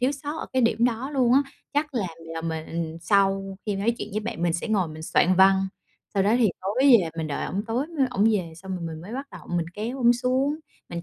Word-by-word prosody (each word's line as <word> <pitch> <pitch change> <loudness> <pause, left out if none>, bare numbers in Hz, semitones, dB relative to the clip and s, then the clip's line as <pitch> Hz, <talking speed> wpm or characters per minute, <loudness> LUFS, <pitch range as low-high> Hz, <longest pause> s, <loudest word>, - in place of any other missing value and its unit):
thiếu 255 +3 +2
sót 290 +3 -5
ở - - -5
cái 260 -1 +2
điểm 230 0 +3
đó 245 +3 0
luôn 255 -4 +2
á. 275 +2 +6 0.3
Chắc 295 0 0
là 210 -6 0
là 165 0 -7
mình 165 0 -4
sau 195 0 +1
khi 205 -2 -1
nói 225 +4 +1
chuyện - - -5
với 215 - -1
bạn 210 -6 -5
mình 170 -1 +2
sẽ 175 +7 -3
ngồi 190 -6 +1
mình 155 0 -9
soạn 180 +3 +3
văn, 190 0 +5 0.5
sau 195 - +3
đó 210 +4 +3
thì 225 -4 +4
tối 195 +5 -3 0.2
về 165 -3 -2
mình 160 - -1
đợi 145 - -3
ổng 200 +2 -2
tối 245 +5 -1
mới 310 -5 0
ổng 215 -4 +1
về 175 -6 -1
xong 190 +1 -5
rồi 170 - -5
mình 160 -1 -6
mới 195 +7 -9
bắt 275 +2 -4
đầu - - -11
mình 165 -1 0
kéo 235 +6 -4
ổng 240 -1 +5
xuống, 260 +4 0 0.3
mình 170 0 -4
205 Hz, 255 wpm, -25 LUFS, 170-250 Hz, 0.5 s, á